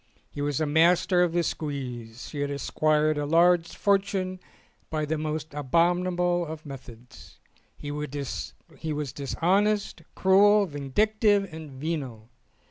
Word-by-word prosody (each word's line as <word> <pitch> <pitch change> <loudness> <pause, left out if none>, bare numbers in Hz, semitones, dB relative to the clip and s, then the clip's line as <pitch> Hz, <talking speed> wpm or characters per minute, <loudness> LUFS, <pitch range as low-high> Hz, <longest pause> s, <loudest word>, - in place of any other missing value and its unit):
He 145 - -6
was 145 -2 -1
a 155 - +1
master 175 +4 +3
of 175 -2 +2
the 170 0 +1
squeeze. 125 -8 -5
He 145 - -6
had 145 0 -1
acquired 155 +1 +1
a 145 - -1
large 170 +2 +4
fortune 195 -2 0 0.5
by 155 -1 -1
the 155 +2 -1
most 155 0 -4
abomi 165 +5 +2
nable 175 -3 -1
methods. 125 -4 -12 0.4
He 145 - -6
was 145 - -5
dishonest, 195 +7 0
cruel, 200 +2 +5
vindic 165 +8 -1
tive, 200 -5 +3
and 160 -1 -8
venal. 130 -6 -5
155 Hz, 125 wpm, -26 LUFS, 145-180 Hz, 0.5 s, cruel